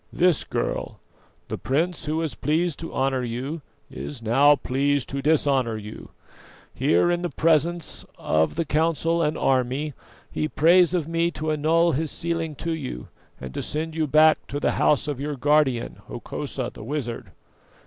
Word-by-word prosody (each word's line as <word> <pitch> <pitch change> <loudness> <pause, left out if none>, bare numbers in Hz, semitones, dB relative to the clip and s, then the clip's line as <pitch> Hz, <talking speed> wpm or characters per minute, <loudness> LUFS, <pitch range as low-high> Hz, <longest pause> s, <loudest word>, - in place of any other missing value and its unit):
"This, 180 -4 +2
girl: - - -3 0.5
the - - -5
prince 165 +5 -1
who 155 +1 -1
was 160 -2 -2
pleased 155 +2 0
to 165 - -6
honour 130 -1 0
you 130 +7 -4 0.3
is 130 -6 -7
now 140 +6 +5
pleased 140 0 0
to 140 0 -3
dishonour 135 -6 +2
you. 105 0 -9 0.6
Here, 90 - +2
in 175 0 0
the 175 - -2
presence 165 +1 +1
of 80 +1 +1
the 165 0 -1
council 165 +2 +1
and 155 0 0
army, 135 +3 0 0.4
he 155 - -1
prays 175 +3 +4
of 165 -4 -1
me 165 +1 +1
to 155 0 -1
annul 165 +3 +3
his 155 +2 -1
sealing 165 -2 -2
to 165 +4 -4
you, 130 - -5 0.3
and 65 -1 -8
to - - -3
send 160 +1 -4
you 160 -1 0
back 155 +2 +5
to 145 - -3
the - - +1
house 150 0 +2
of 145 -3 -3
your 145 +1 -3
guardian, 135 -3 +1
Hokosa - - -5
the - - -10
wizard." 120 -2 -4
150 Hz, 165 wpm, -24 LUFS, 135-165 Hz, 0.6 s, now